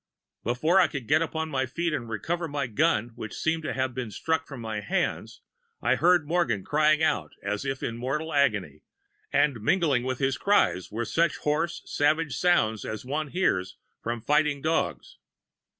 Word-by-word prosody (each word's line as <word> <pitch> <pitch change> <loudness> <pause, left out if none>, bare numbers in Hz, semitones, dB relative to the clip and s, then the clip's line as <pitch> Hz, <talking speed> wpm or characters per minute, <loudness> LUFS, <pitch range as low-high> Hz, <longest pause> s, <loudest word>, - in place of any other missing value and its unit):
"Before 155 - +2
I 180 - +5
could 140 -5 -6
get - - +4
upon 160 -1 -2
my 130 -2 0
feet 170 +5 -2
and 120 -6 -3
recover 165 - -2
my 145 -2 -2
gun, 120 -2 +1
which 110 -2 -7
seemed 160 +1 0
to 155 - -3
have 130 -1 -1
been 125 -2 -4
struck 160 - -1
from 135 -3 -8
my 110 -2 -4
hands, 105 - -2 0.4
I 120 - +2
heard 165 +3 +3
Morgan 160 - 0
crying 155 +1 +3
out 80 - 0
as 105 +5 -2
if 135 -1 -3
in 115 - -3
mortal 145 +6 -3
agony, 105 - +1 0.5
and 135 -7 +2
mingling 145 - +2
with 130 0 -2
his 135 0 0
cries 200 - +2
were 115 +3 -2
such 165 +6 +1
hoarse 155 +4 -1
savage 150 +1 +1
sounds 110 - +2
as 110 +2 -5
one 150 +4 -2
hears 100 - 0 0.2
from 115 0 -3
fighting 150 +3 +2
dogs. 160 +3 -2
140 Hz, 175 wpm, -27 LUFS, 115-160 Hz, 0.5 s, I